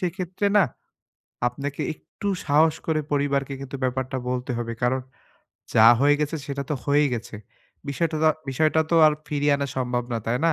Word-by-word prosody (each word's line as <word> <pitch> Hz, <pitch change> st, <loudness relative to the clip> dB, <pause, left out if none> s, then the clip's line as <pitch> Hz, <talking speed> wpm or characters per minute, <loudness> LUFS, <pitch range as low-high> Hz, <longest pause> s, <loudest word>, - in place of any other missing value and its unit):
সেক্ষেত্রে 185 Hz, +2 st, -2 dB
না, 195 Hz, -, +6 dB, 0.8 s
আপনাকে 140 Hz, +3 st, -6 dB
একটু 205 Hz, -, -7 dB, 0.2 s
সাহস 155 Hz, +2 st, +4 dB
করে 160 Hz, -1 st, +1 dB
পরিবারকে 140 Hz, -1 st, 0 dB
কিন্তু 135 Hz, 0 st, -6 dB
ব্যাপারটা 130 Hz, +1 st, -2 dB
বলতে 125 Hz, 0 st, -3 dB
হবে। 115 Hz, -1 st, -3 dB
কারণ, 125 Hz, +2 st, +2 dB, 0.7 s
যা 110 Hz, 0 st, +7 dB
হয়ে 145 Hz, +1 st, +5 dB
গেছে, 150 Hz, +2 st, -1 dB
সেটা 140 Hz, 0 st, -3 dB
তো 150 Hz, -, +2 dB
হয়েই 145 Hz, 0 st, +3 dB
গেছে। 115 Hz, -1 st, -6 dB, 0.5 s
বিষয়টা 160 Hz, +3 st, -1 dB, 0.3 s
বিষয়টা 155 Hz, +3 st, +2 dB
তো -, -, +2 dB
আর 155 Hz, -, +5 dB, 0.2 s
ফিরিয়ে 145 Hz, 0 st, +1 dB
আনা 140 Hz, -, -2 dB
সম্ভব 125 Hz, -1 st, -1 dB
না, 115 Hz, -, 0 dB
তাই 120 Hz, +2 st, +1 dB
না? 165 Hz, -, +4 dB
140 Hz, 165 wpm, -24 LUFS, 130-155 Hz, 0.8 s, যা